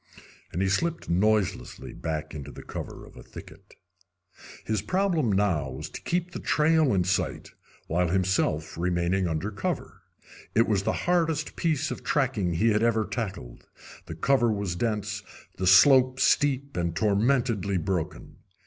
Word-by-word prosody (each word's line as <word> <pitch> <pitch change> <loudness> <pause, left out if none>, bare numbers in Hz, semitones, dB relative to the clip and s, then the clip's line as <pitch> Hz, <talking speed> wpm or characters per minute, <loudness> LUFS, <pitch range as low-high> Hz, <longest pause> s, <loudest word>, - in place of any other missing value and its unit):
And 90 - -1
he - - +1
slipped 165 - -1
noiselessly 100 +1 0
back 80 -2 -4
into 70 -2 -7
the - - -11
cover - - -7
of - - -17
a - - -11
thicket. - - -13 0.9
His 110 -3 -1
problem 165 - +1
now 95 -8 +1
was 65 +4 -7
to - - -8
keep 175 0 -2
the - - -6
trail 155 -1 +3
in 95 -3 +2
sight 90 +1 -2 0.3
while 90 +2 0
himself 85 -4 0
remaining 90 +1 0
under 85 +6 -2
cover. 100 - -4 0.5
It 115 - +4
was 100 -3 +1
the - - 0
hardest 165 -4 0
piece 155 -3 0
of - - -6
tracking 120 - 0
he 110 +7 +3
had 105 0 +2
ever 115 -2 +2
tackled. 100 - -6 0.4
The 80 - -6
cover 120 +6 +2
was 100 -4 -2
dense, 105 +1 -2 0.4
the 95 - -1
slope 130 +6 +6
steep 140 -1 +2
and 85 -1 -1
tormentedly 105 0 +1
broken. 90 0 -3
105 Hz, 150 wpm, -27 LUFS, 90-130 Hz, 0.9 s, slope